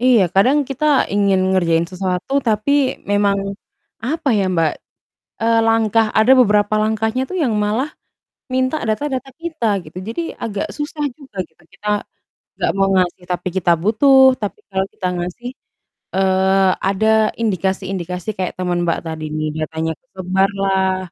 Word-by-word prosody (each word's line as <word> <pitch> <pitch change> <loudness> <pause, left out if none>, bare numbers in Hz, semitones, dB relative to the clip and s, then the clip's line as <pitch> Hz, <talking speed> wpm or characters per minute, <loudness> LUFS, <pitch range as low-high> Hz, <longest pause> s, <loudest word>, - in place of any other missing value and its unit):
Iya 245 -4 +5
kadang 255 +10 +4
kita 270 +2 -3 0.3
ingin 200 -1 +3
ngerjain 170 -3 +2
sesuatu 185 +5 -3 0.2
tapi 215 +4 0 0.4
memang, 205 -1 +2 0.7
apa 300 +3 -1
ya 195 - +2
Mbak, 165 -2 +2 0.7
eee, 230 0 +3
langkah 225 0 +3
ada 220 +4 +5
beberapa 210 -3 +3
langkahnya 220 +3 0
tuh - - -5
yang 250 - +1
malah, 225 +8 0 0.7
minta 260 +3 +1
data-data 265 +4 -2
kita 320 -8 -3 0.2
gitu 155 +4 -10
jadi 230 +9 -3 0.2
agak 205 -3 -2
susah 295 0 -4
juga 270 -8 -16
gitu 160 +1 -29
kita, 210 - -8 0.7
nggak - - +1
mau 195 0 +3
ngasih 180 -1 0
tapi 180 0 -2
kita 175 -2 +2
butuh, 265 +4 +5
tapi 205 - -4
kalau 190 -1 0
kita 185 - -3
ngasih, 180 +8 -5 0.7
eee, 190 0 +3 0.2
ada 195 +3 +1 0.3
indikasi-indikasi 190 -2 -2
kayak 185 -1 -2
temen 180 -1 0
Mbak 170 - 0
tadi 160 -1 -5
nih, 155 0 -1 0.2
datanya 160 +1 -3
ke - - -46
sebar 190 +1 +1
lah, 190 -1 +1
200 Hz, 145 wpm, -19 LUFS, 185-230 Hz, 0.7 s, Iya